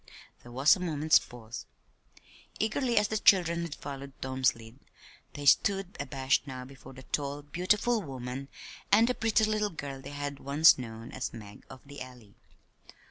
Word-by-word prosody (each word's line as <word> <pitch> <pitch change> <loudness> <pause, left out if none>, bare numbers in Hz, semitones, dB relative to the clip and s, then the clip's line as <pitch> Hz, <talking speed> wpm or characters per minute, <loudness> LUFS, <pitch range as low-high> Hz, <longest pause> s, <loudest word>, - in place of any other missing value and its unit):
There 120 - -13
was 135 +4 +5
a - - -8
moment's 155 -3 +3
pause. 120 -1 -10 0.9
Eagerly 235 +2 0
as 210 0 +3
the 220 - -1
children 170 -4 +4
had 170 -3 -5
followed 140 -1 -8
Tom's 130 0 +1
lead, 115 +3 -14 0.5
they 145 - -7
stood 195 +5 +3
abashed 135 0 0
now 130 -1 -7
before 135 0 -13
the 130 0 -12
tall, 145 +1 -3
beautiful 210 +9 +1
woman 135 -3 -6 0.4
and 220 +3 +6
the 250 - +1
pretty 225 -2 +1
little 215 -1 0
girl 140 -6 -7
they 135 - -9
had 145 -1 -5
once 145 +3 +5
known 115 -1 -8
as 130 - -5
"Mag 105 -3 -11
of 130 - -11
the 140 0 -10
Alley." 125 -5 -11
140 Hz, 165 wpm, -29 LUFS, 130-180 Hz, 0.9 s, and